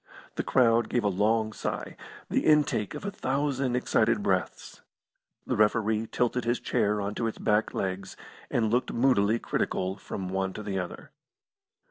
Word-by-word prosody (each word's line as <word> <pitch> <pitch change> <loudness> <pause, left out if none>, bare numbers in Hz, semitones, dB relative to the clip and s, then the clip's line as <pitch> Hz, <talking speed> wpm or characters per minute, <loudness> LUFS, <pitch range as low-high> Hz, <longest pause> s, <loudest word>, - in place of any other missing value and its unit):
The - - -2
crowd 115 -2 +3
gave 120 - 0
a - - +2
long 110 +3 +1
sigh - - -4 0.3
the - - 0
intake 150 -9 +2
of - - -7
a 200 - -2
thousand 135 -6 -1
excited 125 - +2
breaths. - - -2 0.6
The - - -1
referee 110 +1 +2
tilted 125 0 0
his 120 +1 0
chair 105 0 0
on 100 0 -2
to 115 +1 -1
its 110 - -4
back 105 0 +1
legs, 95 0 -3 0.3
and 110 -3 +1
looked 125 +2 +1
moodily 115 -4 +3
critical 95 -4 -2
from 95 -1 -6
the 90 - -5
one 95 0 -1
to 105 - -7
the 100 -2 -2
other. 90 - -7
110 Hz, 165 wpm, -28 LUFS, 100-125 Hz, 0.6 s, crowd